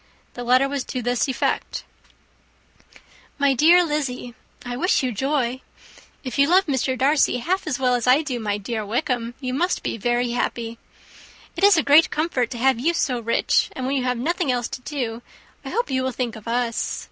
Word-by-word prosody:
The 245 - -6
letter 255 +3 +4
was 275 -1 -3
to 255 -2 -4
this 245 +3 0
effect: 265 - -2 1.0
/* - - -29 0.4
"My 280 -1 +3
dear 335 +7 +6
Lizzy, 270 -6 -3 0.2
*/ - - -22
"I 245 0 -4
wish 280 +3 +1
you 255 - 0
joy. 260 +1 -1 0.6
If 260 +1 -5
you 280 - +5
love 370 +4 +4
Mr. 265 -2 -1
Darcy 275 0 +3
half 360 +10 -2
so 250 - -2
well 250 -1 +3
as 245 -1 -1
I 265 +5 +5
do 260 -5 -3
my 205 -2 -2
dear 215 +2 -4
Wickham, 240 +1 -2
you 255 -2 -4
must 355 +7 0
be - - -3
very 240 +2 0
happy. 235 -1 -3 0.8
It - - -4
is 400 -3 +7
a 320 - +3
great 295 +4 +6
comfort 295 -6 -1
to 240 - -6
have 260 0 +2
you 335 +7 +1
so 255 -7 0
rich; 230 0 +1
and 260 - -5
when 270 +2 -1
you 260 - 0
have 250 -1 0
nothing 320 +3 0
else 245 -1 -1
to - - -7
do, 245 -5 -4 0.4
I - - -6
hope 475 - -2
you 260 0 +1
will 260 0 -1
think 245 -2 -3
of 220 0 -12
us. 235 0 -1
255 Hz, 205 wpm, -22 LUFS, 240-285 Hz, 1.0 s, is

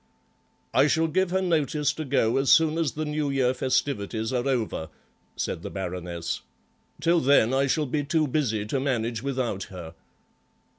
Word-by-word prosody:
"I 145 - +5
shall 160 +2 +2
give 185 +3 +1
her 190 +1 0
notice 155 -4 +1
to 160 - -5
go 125 -4 +2
as 135 0 +3
soon 160 0 +5
as 160 -4 0
the 155 +1 -3
New 150 -1 -1
Year 130 -2 +2
festivities 125 -3 -1
are 125 +1 0
over," 115 -11 -1 0.5
said - - -3
the - - -6
Baroness; 90 -3 -4 0.6
"till 170 +1 +3
then 130 -4 +4
I 135 +1 +2
shall 150 +3 +1
be 145 +2 -1
too 155 +1 +1
busy 120 -7 0
to 130 +6 -1
manage 120 -4 -1
without 125 -7 -2
her." 85 -3 -9
135 Hz, 165 wpm, -26 LUFS, 110-150 Hz, 0.6 s, I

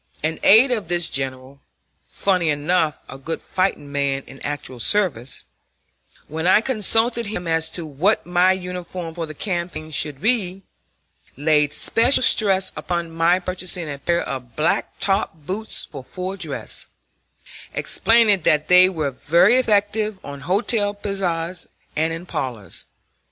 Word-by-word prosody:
An 160 +1 -1
aide 230 +6 +6
of 215 -7 -1
this 175 -1 +1
general 135 0 -3 0.4
funnily 180 -4 0
enough 155 +1 +1
a 135 - -10
good 160 +4 -4
fighting 185 -6 -2
man 140 -1 -1
in 135 +1 -14
actual 145 -4 -5
service 135 - -1 0.8
when 160 +3 -3
I 185 - +6
consulted 230 0 +2
him 180 -4 -5
as 160 0 +2
to 165 +1 -5
what 160 +9 0
my 180 +1 +3
uniform 180 -2 -5
for 165 -1 -5
the 155 - -9
campaign 170 -3 -4
should 145 -2 -2
be, 195 - 0 0.7
laid 150 0 +2
special 235 +4 +4
stress 195 -5 +3
upon 170 -2 -3
my 165 +2 +3
purchasing 180 -3 -1
a 140 - -7
pair 170 +4 0
of 125 -3 -6
black 155 +2 0
top 195 -3 0
boots 190 +8 -4
for 135 - -8
full 185 +7 -6
dress, 190 - -4 0.8
explaining 225 -4 +3
that 155 0 +1
they 180 +1 +7
were 155 -6 -2
very 170 - +3
effective 210 -3 +1
on 140 -1 -8
hotel 205 - 0
piazzas 180 -4 -3 0.3
and 160 +1 0
in 165 +2 -6
parlors. 120 - -6
175 Hz, 140 wpm, -21 LUFS, 150-195 Hz, 0.8 s, they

